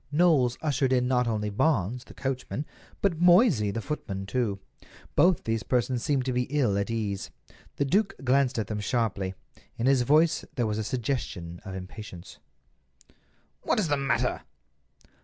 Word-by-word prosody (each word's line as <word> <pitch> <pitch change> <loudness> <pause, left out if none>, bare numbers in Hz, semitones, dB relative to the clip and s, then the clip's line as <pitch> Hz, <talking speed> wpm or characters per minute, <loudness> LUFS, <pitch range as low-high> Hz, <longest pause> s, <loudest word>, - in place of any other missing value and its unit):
Knowles 145 -6 +3
ushered 140 -3 +1
in 125 -1 +2
not 125 -1 +2
only 105 -2 -1
Barnes, 120 - 0
the - - -14
coachman, 135 +2 -3 0.4
but 175 -5 +1
Moysey, 175 - +5
the 115 +3 -3
footman, 95 -10 -4
too. 100 0 -1 0.6
Both 180 0 +4
these 115 -1 -1
persons 125 0 0
seemed 140 -3 0
to 130 - -1
be 125 0 +1
ill 130 -8 +1
at 100 +1 -1
ease. 105 -4 -2 0.5
The 140 - 0
duke 195 +8 +1
glanced 135 0 +2
at 110 - 0
them 105 +1 -4
sharply. 100 -4 -1 0.4
In 115 - -1
his 135 -1 +4
voice 155 +6 +3
there 120 - +1
was 105 0 -1
a - - -1
suggestion 105 -8 -3
of 95 -1 -6
impatience. 95 -1 -9 1.2
"What - - +1
is 180 -6 0
the 145 - +3
matter?" 135 0 0
125 Hz, 160 wpm, -27 LUFS, 105-140 Hz, 1.2 s, Moysey